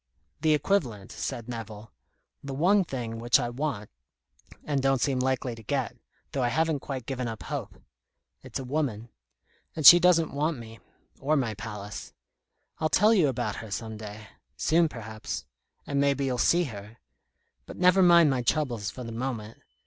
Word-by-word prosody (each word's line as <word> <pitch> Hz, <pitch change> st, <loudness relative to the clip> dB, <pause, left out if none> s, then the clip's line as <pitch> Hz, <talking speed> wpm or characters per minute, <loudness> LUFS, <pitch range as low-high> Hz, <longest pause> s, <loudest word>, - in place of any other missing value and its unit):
"The 155 Hz, -1 st, +4 dB
equivalent," 130 Hz, -, -1 dB
said 115 Hz, -1 st, -5 dB
Nevill. 110 Hz, -2 st, -7 dB, 0.5 s
"The 140 Hz, -1 st, -5 dB
one 190 Hz, +7 st, +4 dB
thing 120 Hz, -7 st, -5 dB
which 120 Hz, +2 st, +3 dB
I 120 Hz, -2 st, -2 dB
want, 120 Hz, -5 st, -4 dB, 0.7 s
and 145 Hz, -2 st, -1 dB
don't 135 Hz, 0 st, +2 dB
seem 135 Hz, 0 st, +1 dB
likely 130 Hz, -1 st, 0 dB
to 115 Hz, -, -11 dB
get, 125 Hz, +1 st, -2 dB, 0.4 s
though 135 Hz, -, -2 dB
I 125 Hz, -, +2 dB
haven't 160 Hz, +3 st, +1 dB
quite 130 Hz, -3 st, -6 dB
given 130 Hz, -2 st, -3 dB
up 110 Hz, -2 st, -6 dB
hope. -, -, -6 dB, 0.6 s
It's -, -, -6 dB
a 135 Hz, -, -5 dB
woman. 125 Hz, -5 st, -2 dB, 0.7 s
And 155 Hz, -, -3 dB
she 175 Hz, +5 st, +12 dB
doesn't 170 Hz, -2 st, +3 dB
want 150 Hz, +2 st, 0 dB
me 115 Hz, -1 st, -11 dB, 0.4 s
or 150 Hz, +3 st, +1 dB
my 120 Hz, -5 st, 0 dB
palace. 105 Hz, -2 st, -7 dB, 0.7 s
I'll 155 Hz, -, +1 dB
tell 215 Hz, +6 st, +5 dB
you 180 Hz, -9 st, +4 dB
about 120 Hz, -5 st, -2 dB
her 110 Hz, -, -8 dB
some 110 Hz, +2 st, -5 dB
day 105 Hz, 0 st, -9 dB, 0.3 s
soon, 165 Hz, 0 st, +3 dB
perhaps. 105 Hz, -, -6 dB, 0.4 s
And 140 Hz, 0 st, 0 dB
maybe 140 Hz, 0 st, +1 dB
you'll 125 Hz, -2 st, -1 dB
see 175 Hz, +7 st, +4 dB
her. 110 Hz, -5 st, -8 dB, 0.7 s
But -, -, -9 dB
never 180 Hz, +1 st, +5 dB
mind 170 Hz, -4 st, +6 dB
my 130 Hz, -2 st, 0 dB
troubles 120 Hz, -6 st, 0 dB
for 125 Hz, -, -8 dB
the 115 Hz, -, -7 dB
moment. 115 Hz, -2 st, -5 dB
130 Hz, 170 wpm, -27 LUFS, 115-150 Hz, 0.7 s, she